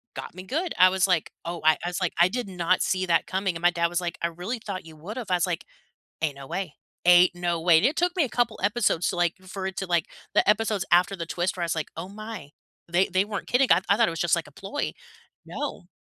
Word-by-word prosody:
got - - -7
me 185 - -8
good. 320 - -2
I 185 0 +8
was 190 0 +2
like, 180 -4 +1 0.2
"Oh," 170 0 -4
I 155 0 +5
I - - 0
was 180 +1 -4
like, 180 - 0
"I 175 - +7
did 235 +2 -3
not 180 -1 0
see 185 0 0
that 170 -2 +2
coming," 190 -2 -1
and 165 - -6
my 175 - +5
dad 170 0 +1
was 175 +1 -2
like, 175 -1 -4
"I - - +3
really 180 +8 -5
thought 185 -4 -5
you 160 -1 -12
would 190 +10 -8
have," 235 -6 -5
I 180 - +3
was 175 - +2
like, 170 -2 -2 0.6
"Ain't 145 -3 0
no 135 -1 -9
way, 185 -3 -4 0.3
ain't 180 0 +6
no 175 -1 -1
way," 165 -1 +6
and 215 - +3
it 295 - 0
took 355 +1 +1
me 340 - +3
a - - -3
couple 240 -2 -1
episodes 205 -5 +1
to, 180 - -4
like 175 -1 +1
for 190 +1 -6
it 190 - -5
to, 195 - -2
like 170 -3 +1 0.3
the - - +3
episodes 210 -2 +2
after 180 +3 +4
the 165 -2 -5
twist 175 +2 -2
where 175 - -4
I - - -1
was 165 - -1
like, 160 -2 -3
"Oh 185 - -5
my, 215 -7 -8 0.4
they 175 +3 +2
they 190 +1 +2
weren't 205 -1 -5
kidding," 255 +2 +4
I 170 - +5
I 200 - +6
thought 230 -1 +4
it - - -1
was 165 - -5
just 175 0 +3
like 165 - -3
a 145 - -16
ploy. 200 - -4 0.5
No. 275 -11 -5
180 Hz, 280 wpm, -26 LUFS, 170-205 Hz, 0.6 s, I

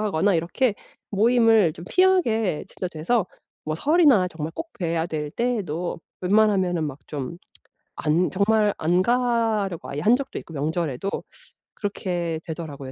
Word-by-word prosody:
하거나 205 -2 +2
이렇게 200 +8 +1 0.4
모임을 225 -3 +4
좀 170 - -10
피하게 240 - +2
진짜 185 - -5
돼서 175 +6 0 0.4
뭐 155 0 -2
설이나 285 - +4
정말 160 -2 -6
꼭 330 0 -6
봬야 165 -2 -1
될 150 -3 -4
때에도 190 -8 -2 0.2
웬만하면은 190 -3 +2
막 145 -2 -5
좀 145 +3 -5 0.6
안 165 +3 +1
정말 205 +1 +2
안 175 +3 +2
가려고 225 -5 0
아예 145 - -4
한 220 +7 +5
적도 275 0 -5
있고 - - -11
명절에도. 155 +2 -2 0.7
그렇게 175 -5 -3
되더라고요 150 -5 -6
185 Hz, 295 characters per minute, -24 LUFS, 160-225 Hz, 0.7 s, 한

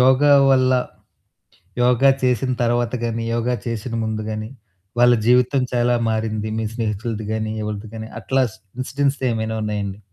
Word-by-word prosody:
యోగా 130 +3 +5 0.2
వల్ల, 130 -1 +4 1.1
యోగా 125 +2 +5
చేసిన 125 0 +1
తర్వాత 120 0 +1
గాని, 115 0 -2
యోగా 120 +1 0
చేసిన 115 0 -4
ముందు 110 0 -2
గాని 110 +1 -4 0.5
వాళ్ళ 120 0 +6
జీవితం 125 +2 +4
చాలా 120 0 +2 0.2
మారింది 110 -1 -2
మీ 110 - -1
స్నేహితులది 110 -1 -3
గాని, 110 0 -2
యెవలది 105 0 -5
గాని 110 0 -6
అట్లా 130 +3 +1 0.4
ఇన్సిడెంట్స్ 140 +2 -1
ఏమైనా 110 0 -2
ఉన్నాయండి? 105 -2 -3
115 Hz, 135 wpm, -21 LUFS, 110-125 Hz, 1.1 s, వాళ్ళ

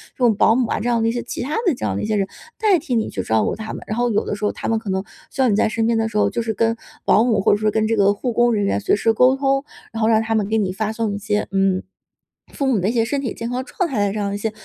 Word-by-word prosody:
这 - - -40
种 230 -3 +4
保 220 +2 +4
姆 250 -1 +1
啊 - - 0
这 235 +3 -1
样 235 -1 +1
的 225 - +1
一 - - +1
些， 240 +1 -3
其 - - -5
他 285 +5 -3
的 350 - +4
这 - - -5
样 100 -2 -1
的 - - -2
一 - - -1
些 215 0 0
人， 195 -2 0 0.3
代 415 -4 +4
替 275 -5 -3
你 225 - 0
去 95 - -4
照 110 +3 +1
顾 - - -1
他 220 0 -6
们。 - - -7
然 215 - -3
后 245 0 +1
有 210 - 0
的 - - -2
时 210 - -9
候 - - +1
他 - - -6
们 225 - +1
可 220 -2 -8
能 190 0 -1 0.3
需 270 - -2
要 255 - +4
你 205 - +2
在 215 - +2
身 225 0 -1
边 230 -1 +2
的 225 0 +1
时 210 - -3
候， - - +3
就 235 - -2
是 225 -1 -2
跟 225 +2 +1 0.3
保 215 - +5
姆 235 -4 +2
或 - - +3
者 - - +2
说 215 0 +1
跟 220 0 +1
这 225 - +1
个 200 -1 +4
护 240 +5 -3
工 240 +1 +3
人 205 -2 +1
员 100 - 0
随 - - +2
时 225 +2 +2
沟 255 +3 +4
通， 275 0 +1 0.3
然 225 - -5
后 220 - +3
让 220 -1 +4
他 225 0 -1
们 210 -2 +1
给 220 +1 0
你 200 -4 0
发 215 +2 -2
送 220 -2 -2
一 - - -3
些， 210 0 -1
嗯， 195 -1 +1 0.7
父 280 - -2
母 250 -6 +2
的 185 +3 0
一 - - +1
些 230 -2 +1
身 275 +4 -2
体 250 -6 -3
健 230 - -5
康 250 +1 -2
状 360 +6 -2
态 215 -7 0
的 195 - -2
这 215 - -3
样 200 -1 -1
的 200 - -3
一 - - -2
些 220 +2 -2
220 Hz, 385 characters per minute, -20 LUFS, 205-240 Hz, 0.7 s, 保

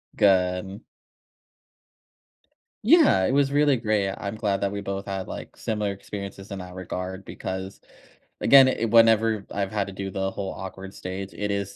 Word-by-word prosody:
Gun. 95 0 +2 2.0
Yeah. 280 - +5
It - - +1
was 140 -1 +3
really 145 -1 +3
great. 105 -4 0
I'm 100 +2 -5
glad 100 -3 -1
that 100 0 0
we 100 - -4
both 100 0 -4
had, 95 -1 -4
like, - - -8
similar 105 -2 -2
experiences 100 0 -8
in 100 - -5
that 90 0 -9
regard 95 +1 -5
because 95 +1 -6 0.6
again, 135 -1 +8
it 115 -3 -1
whenever 115 -2 +4
I've 100 0 -2
had 100 -2 -1
to 100 - -8
do 95 0 -5
the 95 0 -2
whole 95 0 -4
awkward 95 0 -8
stage, 95 +1 -6
it 105 0 -3
is 100 0 -3
100 Hz, 165 wpm, -25 LUFS, 95-110 Hz, 2.0 s, again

